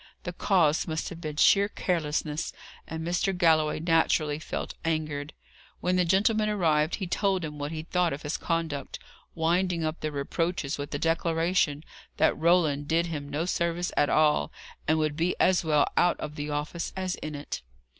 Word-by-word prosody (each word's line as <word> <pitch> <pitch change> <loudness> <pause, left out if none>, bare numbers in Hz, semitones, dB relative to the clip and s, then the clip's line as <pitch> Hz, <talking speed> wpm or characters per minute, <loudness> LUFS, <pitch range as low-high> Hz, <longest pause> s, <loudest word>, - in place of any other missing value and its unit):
The 180 - -4
cause 175 -5 +2
must 160 0 -2
have 170 -1 -9
been 155 -3 -5
sheer 200 +6 +5
carelessness, 155 -5 -2 0.3
and 160 0 -5
Mr. 180 +2 0
Galloway 160 -4 +3
naturally 160 -2 +2
felt - - -5
angered. 155 -2 -2 0.5
When 180 +1 0
the 180 -1 +3
gentleman 215 +4 +2
arrived, 160 -6 +2
he 195 - -4
told 190 0 0
him 150 -1 -7
what 145 +1 -3
he 155 -1 -4
thought 175 0 +1
of 140 - -5
his 150 +1 -2
conduct, 165 -5 -2 0.4
winding 170 +1 +1
up 155 +1 -2
the 155 - -3
reproaches 145 +1 -2
with 145 - -5
a - - +1
declaration 165 -1 +1 0.3
that - - +3
Roland 155 -4 +2
did 165 +2 +2
him 145 -2 -5
no 150 +4 -1
service 175 0 -1
at 145 - +3
all, 150 - +3 0.4
and 155 +1 +3
would 155 -1 0
be 170 +3 0
as 185 -2 +4
well 150 -2 +3
out 175 0 +3
of 150 - -5
the 150 0 -5
office 150 +3 -3
as 185 -1 -1
in 155 0 -6
it. 145 +1 -5
160 Hz, 175 wpm, -27 LUFS, 150-175 Hz, 0.5 s, sheer